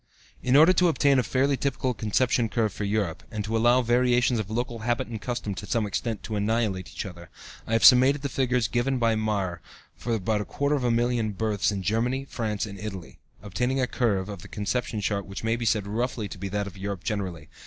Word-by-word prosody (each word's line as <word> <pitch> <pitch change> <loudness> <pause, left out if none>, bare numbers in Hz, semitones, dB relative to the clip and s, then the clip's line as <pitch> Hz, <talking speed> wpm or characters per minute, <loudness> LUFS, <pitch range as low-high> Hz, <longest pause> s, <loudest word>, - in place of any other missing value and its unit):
In 130 +1 +2
order 160 +5 +7
to 180 0 +4
obtain 140 -4 +3
a - - +4
fairly 135 +3 +1
typical 130 -1 -1
conception 115 +1 +1
curve 110 -3 0
for 105 - -4
Europe, 100 -5 -1
and 105 -2 -4
to 110 +2 -2
allow 120 +3 +4
the 120 - -7
variations 125 -1 +3
of 105 -2 -4
local 120 +1 -3
habit 120 +2 -1
and 110 -2 -6
custom 120 -4 -3
to 95 - -7
some 115 -3 0
extent 105 +2 -3
to 110 - -4
annihilate 105 -3 0
each - - -5
other, 90 -2 -10 0.4
I 115 - -2
have 115 - +2
summated 130 +3 +7
the 140 - -1
figures 125 -4 +1
given 125 +4 0
by 115 -2 +2
Mayr 100 -5 -1 0.3
for 120 -1 -2
about 105 +1 0
a - - -4
quarter 140 +1 -1
of 140 -3 0
a 120 - +2
million 115 -2 +1
births 105 0 0
in 100 -2 -3
Germany, 120 +7 0
France, 110 -5 -2
and 100 -2 -9
Italy, 95 -5 -7 0.2
obtaining 125 +6 -1
a 130 - +3
curve 110 -7 0
(Chart - - -14
2) - - -4
of 95 - -10
the - - -11
conception 105 +1 -2
rate 100 -2 -2
which 100 +2 -7
may 115 +1 +1
be 120 0 -4
said 105 -2 +1
roughly 110 +1 -2
to 95 - -9
be 100 +1 -4
that 100 +1 -1
of 100 -2 -9
Europe 95 -1 -5
generally. 95 -8 -3
110 Hz, 235 wpm, -26 LUFS, 100-125 Hz, 0.4 s, order